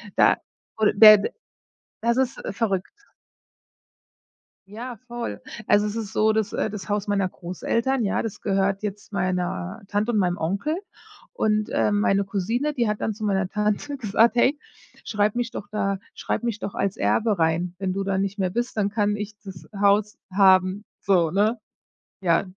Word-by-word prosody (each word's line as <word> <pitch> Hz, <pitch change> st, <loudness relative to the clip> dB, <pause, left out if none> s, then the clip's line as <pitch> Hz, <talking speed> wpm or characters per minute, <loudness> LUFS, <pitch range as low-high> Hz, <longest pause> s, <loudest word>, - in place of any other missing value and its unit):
da, -, -, +5 dB, 0.4 s
wohl 215 Hz, -1 st, +3 dB
bed 215 Hz, -1 st, +8 dB, 0.7 s
das 235 Hz, +1 st, +2 dB
ist, 260 Hz, 0 st, 0 dB
äh, -, -, -3 dB
verrückt. 195 Hz, -4 st, -1 dB, 1.8 s
Ja, 235 Hz, +4 st, -7 dB
voll. 240 Hz, -1 st, -5 dB, 0.3 s
Also 205 Hz, 0 st, +4 dB
es 210 Hz, -, -4 dB
ist 220 Hz, -3 st, -5 dB
so 220 Hz, 0 st, +3 dB
das 220 Hz, -2 st, -1 dB
äh, -, -, 0 dB
das 210 Hz, -1 st, -7 dB
Haus 205 Hz, 0 st, -1 dB
meiner 200 Hz, -2 st, +1 dB
Großeltern, 230 Hz, +9 st, -2 dB
ja, 200 Hz, -, 0 dB
das 225 Hz, -3 st, -6 dB
gehört 195 Hz, 0 st, 0 dB
jetzt 205 Hz, 0 st, -5 dB
meiner 180 Hz, +1 st, -2 dB
Tante 210 Hz, +4 st, 0 dB
und 215 Hz, -, +1 dB
meinem 180 Hz, -2 st, +1 dB
Onkel. 200 Hz, -, -1 dB, 0.6 s
Und, 215 Hz, -, 0 dB
äh, -, -, +1 dB
meine 200 Hz, -1 st, +2 dB
Cousine, 225 Hz, +9 st, -1 dB
die 240 Hz, -5 st, 0 dB
hat 210 Hz, -, -2 dB
dann 220 Hz, -, -1 dB
zu 215 Hz, +1 st, -9 dB
meiner 190 Hz, -2 st, +1 dB
Tante 210 Hz, +8 st, -1 dB
gesagt: 225 Hz, 0 st, +3 dB
„Hey, 270 Hz, +5 st, +3 dB, 0.5 s
schreib 210 Hz, +1 st, +1 dB
mich 240 Hz, -1 st, -1 dB
doch 200 Hz, -, -7 dB
da 200 Hz, -2 st, 0 dB, 0.2 s
schreib -, -, -3 dB
mich 230 Hz, -2 st, -2 dB
doch 200 Hz, -, -5 dB
als 195 Hz, -1 st, -1 dB
Erbe 215 Hz, -4 st, +1 dB
rein. 165 Hz, +2 st, +1 dB
Wenn 190 Hz, -2 st, -1 dB
du 195 Hz, +1 st, -2 dB
dann 195 Hz, -1 st, 0 dB
nicht 200 Hz, +1 st, -2 dB
mehr 185 Hz, -1 st, +1 dB
bist, 240 Hz, +6 st, -3 dB
dann 200 Hz, -1 st, +2 dB
kann 205 Hz, 0 st, 0 dB
ich 210 Hz, 0 st, -6 dB
das 190 Hz, -4 st, -10 dB
Haus 205 Hz, +1 st, +3 dB
haben.“ 190 Hz, 0 st, +4 dB, 0.2 s
So, 175 Hz, -5 st, +2 dB
ne? 215 Hz, +5 st, +2 dB, 0.6 s
Ja, 170 Hz, 0 st, +2 dB
205 Hz, 175 wpm, -24 LUFS, 195-220 Hz, 1.8 s, bed